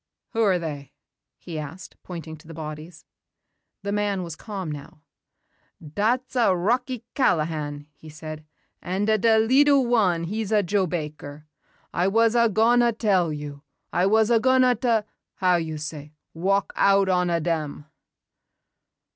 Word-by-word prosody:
"Who 230 Hz, -, -1 dB
are 195 Hz, -4 st, +3 dB
they?" 145 Hz, -4 st, -6 dB, 0.4 s
he 165 Hz, +1 st, -7 dB
asked 155 Hz, +5 st, -9 dB
pointing 165 Hz, -3 st, -8 dB
to 160 Hz, +1 st, -19 dB
the 165 Hz, -, -10 dB
bodies. 155 Hz, +1 st, -8 dB, 0.8 s
The 200 Hz, -, -2 dB
man 205 Hz, -2 st, -1 dB
was 170 Hz, -2 st, -6 dB
calm 190 Hz, -3 st, -6 dB
now. 145 Hz, 0 st, -9 dB, 0.8 s
"Dat's 220 Hz, -, -1 dB
a' 230 Hz, -7 st, +3 dB
Rocky 245 Hz, +5 st, -1 dB
Callahan," 155 Hz, -, 0 dB
he 155 Hz, +2 st, -14 dB
said, 155 Hz, 0 st, -8 dB, 0.4 s
"an'a 205 Hz, +4 st, 0 dB
da 225 Hz, +1 st, +4 dB
leetle 270 Hz, +4 st, +4 dB
wan 200 Hz, -9 st, +2 dB
he's 210 Hz, +4 st, -3 dB
a 210 Hz, -1 st, +3 dB
Joe 195 Hz, +1 st, +1 dB
Baker. 150 Hz, -3 st, -6 dB, 0.5 s
I 175 Hz, +2 st, +1 dB
was 225 Hz, +3 st, +3 dB
a' 235 Hz, -1 st, +4 dB
gon' 225 Hz, +4 st, +3 dB
ta 240 Hz, 0 st, +4 dB
tell 190 Hz, -7 st, +2 dB
you. 145 Hz, -1 st, -7 dB, 0.3 s
I 180 Hz, +2 st, +2 dB
was 220 Hz, +2 st, +3 dB
a' 230 Hz, -, +5 dB
gon' 255 Hz, +1 st, +4 dB
ta 230 Hz, -4 st, +2 dB, 0.3 s
how 180 Hz, -2 st, +3 dB
you 160 Hz, -2 st, -4 dB
say 150 Hz, 0 st, -7 dB, 0.2 s
walk 195 Hz, +4 st, 0 dB
out 195 Hz, 0 st, +4 dB
on 180 Hz, -1 st, +2 dB
a' 170 Hz, -1 st, +1 dB
dem." 155 Hz, -3 st, -3 dB
185 Hz, 150 wpm, -24 LUFS, 155-220 Hz, 0.8 s, a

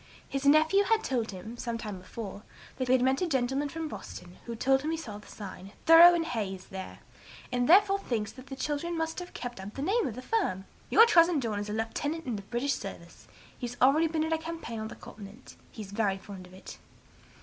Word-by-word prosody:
His 275 Hz, +1 st, -2 dB
nephew 315 Hz, +7 st, +5 dB
had 445 Hz, +1 st, +2 dB
told 240 Hz, -, -1 dB
him, 215 Hz, +5 st, -8 dB
some 235 Hz, -1 st, -3 dB
time 210 Hz, -4 st, -6 dB
before, 200 Hz, +1 st, -8 dB, 0.4 s
that 255 Hz, -, -2 dB
he 255 Hz, +1 st, +5 dB
met 260 Hz, +3 st, +1 dB
a 360 Hz, -, +1 dB
gentleman 270 Hz, 0 st, 0 dB
from 325 Hz, +2 st, -4 dB
Boston, 180 Hz, -10 st, -9 dB
who 235 Hz, -, -4 dB
told 270 Hz, +3 st, +2 dB
him 305 Hz, -, -3 dB
he 325 Hz, -, -1 dB
saw 215 Hz, -10 st, -7 dB
the -, -, -16 dB
sign 195 Hz, -1 st, -9 dB
'Thoreau 335 Hz, +2 st, +9 dB
and 330 Hz, -1 st, 0 dB
Hayse' 195 Hz, -, -4 dB
there, 190 Hz, -1 st, -7 dB, 0.5 s
and 250 Hz, 0 st, 0 dB
he 245 Hz, -, +1 dB
therefore 395 Hz, +2 st, +6 dB
thinks 225 Hz, -, -2 dB
the 270 Hz, +1 st, -10 dB
children 300 Hz, +5 st, -2 dB
must 325 Hz, +1 st, -2 dB
have 355 Hz, 0 st, -9 dB
kept 245 Hz, -4 st, -6 dB
up 195 Hz, +2 st, -8 dB
the 275 Hz, -, -4 dB
name 425 Hz, +7 st, +1 dB
of 230 Hz, -, -5 dB
the 255 Hz, -, -8 dB
firm. 305 Hz, -, -1 dB, 0.2 s
'Your 455 Hz, -, +8 dB
cousin 340 Hz, -7 st, +5 dB
John 220 Hz, -5 st, -2 dB
is 205 Hz, +1 st, -5 dB
a -, -, -3 dB
lieutenant 290 Hz, +9 st, -3 dB
in 245 Hz, -4 st, -2 dB
the 200 Hz, -, -5 dB
British 245 Hz, +7 st, -1 dB
service; -, -, -9 dB, 0.3 s
he 245 Hz, -, -5 dB
has 245 Hz, +1 st, -8 dB
already 290 Hz, +6 st, +5 dB
been 315 Hz, -1 st, -1 dB
in 320 Hz, +1 st, 0 dB
a 320 Hz, -, 0 dB
campaign 320 Hz, -8 st, -6 dB
on 220 Hz, -, -4 dB
the -, -, -9 dB
Continent; 210 Hz, +4 st, -12 dB, 0.2 s
he 220 Hz, -, -7 dB
is 195 Hz, -, -11 dB
very 205 Hz, -2 st, 0 dB
fond 190 Hz, -2 st, -10 dB
of 180 Hz, -, -17 dB
it.' 190 Hz, -, -11 dB
255 Hz, 230 wpm, -29 LUFS, 215-320 Hz, 0.5 s, Thoreau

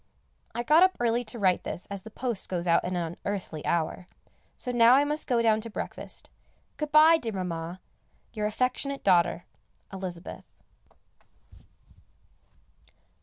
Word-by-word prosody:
I 240 Hz, -, -1 dB
got 305 Hz, +6 st, +5 dB
up 375 Hz, 0 st, +4 dB
early 240 Hz, 0 st, +1 dB
to 225 Hz, +2 st, -6 dB
write 190 Hz, -4 st, +2 dB
this 175 Hz, -, -4 dB
as 200 Hz, -1 st, -5 dB
the 220 Hz, -, -11 dB
post 235 Hz, -2 st, -2 dB
goes 175 Hz, -2 st, -2 dB
at 170 Hz, -1 st, +3 dB
an 180 Hz, +1 st, -3 dB
unearthly 175 Hz, -1 st, -4 dB
hour, 170 Hz, +2 st, -1 dB, 0.5 s
so 250 Hz, -, -2 dB
now 240 Hz, 0 st, +6 dB
I 280 Hz, -, +5 dB
must 300 Hz, +1 st, -2 dB
go 235 Hz, -2 st, +2 dB
down 220 Hz, -1 st, +3 dB
to 230 Hz, -, -6 dB
breakfast. 220 Hz, -, -6 dB, 0.5 s
Good 300 Hz, -1 st, -4 dB
bye, 315 Hz, +2 st, +7 dB
dear 225 Hz, -5 st, -4 dB
Mamma, 175 Hz, -1 st, -4 dB, 0.5 s
your 210 Hz, -2 st, -1 dB
affectionate 255 Hz, +5 st, -2 dB
daughter, 175 Hz, -2 st, +3 dB, 0.5 s
Elizabeth. 185 Hz, -2 st, -6 dB
215 Hz, 140 wpm, -27 LUFS, 180-250 Hz, 0.5 s, bye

